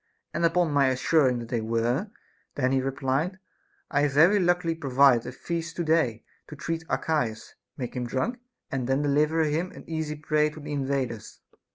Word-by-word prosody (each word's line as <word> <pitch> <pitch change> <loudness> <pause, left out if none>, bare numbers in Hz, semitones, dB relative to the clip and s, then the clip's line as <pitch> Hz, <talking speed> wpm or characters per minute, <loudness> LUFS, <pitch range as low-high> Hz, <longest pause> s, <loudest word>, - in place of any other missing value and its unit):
And - - -1
upon 170 -1 +3
my 140 -2 +4
assuring 130 0 +2
that 115 -1 -7
they 120 -2 -1
were, 115 - 0 0.5
then 130 -2 +1
he 135 -1 +2
replied, 135 +6 -1 0.5
I 145 -2 +2
have 145 -1 +1
very 175 +8 +6
luckily 175 -2 +2
provided 135 -5 +3
a - - -4
feast 170 +5 -4
to 175 - -1
day 155 -9 +1 0.2
to 150 - -9
treat 165 +2 -3
Archias, 125 -9 -1 0.2
make 125 -1 -5
him 125 -1 -2
drunk, 230 - -2 0.3
and 130 -3 -2
then 135 +2 +1
deliver 150 +3 +2
him 160 +4 -1
an - - -12
easy 160 -2 -3
prey 150 0 +1
to 155 +1 -11
the 150 0 -7
invaders. 135 -5 -3
145 Hz, 180 wpm, -26 LUFS, 130-160 Hz, 0.5 s, very